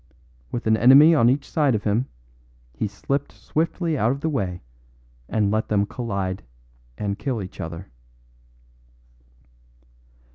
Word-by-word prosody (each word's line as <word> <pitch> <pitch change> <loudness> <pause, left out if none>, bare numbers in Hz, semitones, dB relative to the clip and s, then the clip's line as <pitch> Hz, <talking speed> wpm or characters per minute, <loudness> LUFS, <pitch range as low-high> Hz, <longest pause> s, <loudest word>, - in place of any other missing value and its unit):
With 120 - -4
an 110 0 +4
enemy 135 +8 +7
on 120 -7 +5
each 140 +2 0
side 145 -6 +2
of 105 - -2
him, 110 +5 0 0.7
he 85 - -2
slipped 140 +7 -3
swiftly 165 -1 -2
out 110 +3 +2
of 140 +1 -4
the 160 - 0
way 95 - -3 0.7
and 105 -2 +1
let 110 +1 0
them 100 -1 +1
collide 100 -5 -3 0.6
and 100 -1 -3
kill 130 -5 -2
each 95 -2 -7
other." 85 +1 -7
115 Hz, 135 wpm, -23 LUFS, 100-140 Hz, 0.7 s, enemy